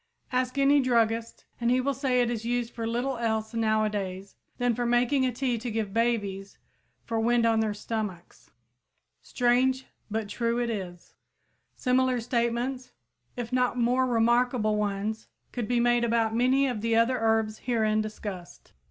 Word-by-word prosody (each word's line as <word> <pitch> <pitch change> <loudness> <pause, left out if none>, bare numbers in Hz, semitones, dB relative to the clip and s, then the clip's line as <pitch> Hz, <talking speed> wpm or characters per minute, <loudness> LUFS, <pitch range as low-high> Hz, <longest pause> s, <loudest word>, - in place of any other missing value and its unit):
Ask 255 +1 -1
any 280 +1 +5
druggist, 230 -2 0
and 235 0 +1
he 250 +1 +3
will 275 +2 0
say 260 -2 +1
it 240 - -1
is 225 -2 -3
used 240 0 -2
for 230 -1 -4
little 245 +2 -2
else 220 -1 -1
nowadays 210 -4 -1 0.2
than 245 -1 +1
for 245 - -2
making 245 +3 +2
a - - -1
tea 245 -1 -1
to 240 +2 -4
give 215 -3 -3
babies 205 -4 -1 0.5
for 230 -1 -2
wind 235 +1 +2
on 225 -1 +3
their 215 -2 0
stomachs. 210 -5 -6 0.7
Strange, 255 +2 +1 0.2
but 220 0 -2
true 230 +3 -1
it 240 -1 0
is! 180 -5 -7 0.6
Similar 255 -1 +1
statements 240 +2 -2 0.4
if 240 0 -5
not 250 -1 +1
more 250 +2 +2
remarkable 235 -1 +2
ones 210 +1 -2 0.2
could 240 -4 -3
be 245 -1 +1
made 240 0 +3
about 230 -1 +1
many 255 +4 +3
of 245 -6 -2
the 230 0 +1
other 235 +2 +3
herbs 220 -1 +1
herein 220 -3 +1
discussed. 205 -4 -8
235 Hz, 160 wpm, -27 LUFS, 220-250 Hz, 0.7 s, any